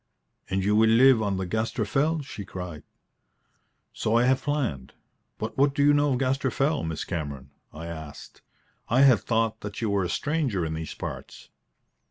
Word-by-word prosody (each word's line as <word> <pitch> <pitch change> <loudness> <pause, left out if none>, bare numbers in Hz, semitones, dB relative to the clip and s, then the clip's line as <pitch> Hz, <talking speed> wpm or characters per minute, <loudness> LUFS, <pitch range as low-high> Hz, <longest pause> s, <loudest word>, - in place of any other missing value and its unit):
"And 95 0 0
you 105 +2 +2
will 110 +1 +5
live 120 +1 +6
on 100 -3 -1
the 95 - -2
Gaster 110 +3 -1
Fell?" 150 +7 0
she 105 -6 -8
cried. 90 -4 -7 1.1
"So 110 +2 +1
I 120 - +4
have 130 +1 +2
planned. 130 - -2 0.4
But 110 +4 -5
what 140 0 +3
do 140 - +2
you 145 - +6
know 145 -1 +3
of - - 0
Gaster 135 +1 0
Fell, 140 +5 0
Miss 80 -1 -3
Cameron?" 70 -6 -5 0.2
I 80 +2 -8
asked. 80 -3 -9 0.5
"I 125 +4 +4
had 135 -4 +6
thought 115 -1 -1
that 105 0 -6
you 110 -3 -1
were 100 -1 +1
a 90 - -2
stranger 135 - -1
in 80 - -3
these 80 -1 -5
parts." 60 +2 -8
110 Hz, 185 wpm, -26 LUFS, 85-135 Hz, 1.1 s, live